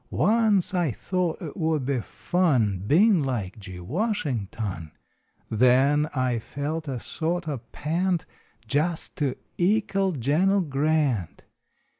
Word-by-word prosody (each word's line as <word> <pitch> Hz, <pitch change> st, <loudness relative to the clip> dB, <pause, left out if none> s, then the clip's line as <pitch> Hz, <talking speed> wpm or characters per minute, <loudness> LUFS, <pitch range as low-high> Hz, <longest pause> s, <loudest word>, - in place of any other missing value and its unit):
Once 215 Hz, -3 st, +2 dB
I 175 Hz, -4 st, +1 dB
thought 175 Hz, -, -2 dB
it 155 Hz, -, -6 dB
would 160 Hz, -6 st, 0 dB
be 135 Hz, -1 st, 0 dB
fun 130 Hz, -, +1 dB
Bein 190 Hz, -, +5 dB
like 115 Hz, -8 st, -3 dB
G. 95 Hz, -3 st, -9 dB
Washington. 110 Hz, -, -3 dB, 0.5 s
Then 130 Hz, +6 st, +4 dB
I 125 Hz, -3 st, +1 dB
felt 150 Hz, +6 st, -4 dB
a 130 Hz, -3 st, -3 dB
sort 170 Hz, +6 st, -2 dB
o 145 Hz, -4 st, -2 dB
pant 170 Hz, +3 st, -1 dB, 0.4 s
Jest 155 Hz, +4 st, 0 dB
to 140 Hz, -4 st, 0 dB, 0.2 s
ekal 195 Hz, 0 st, +2 dB
Gen 150 Hz, +10 st, +2 dB
l 200 Hz, 0 st, +3 dB
Grant. 145 Hz, -, 0 dB
150 Hz, 120 wpm, -25 LUFS, 125-180 Hz, 0.5 s, Bein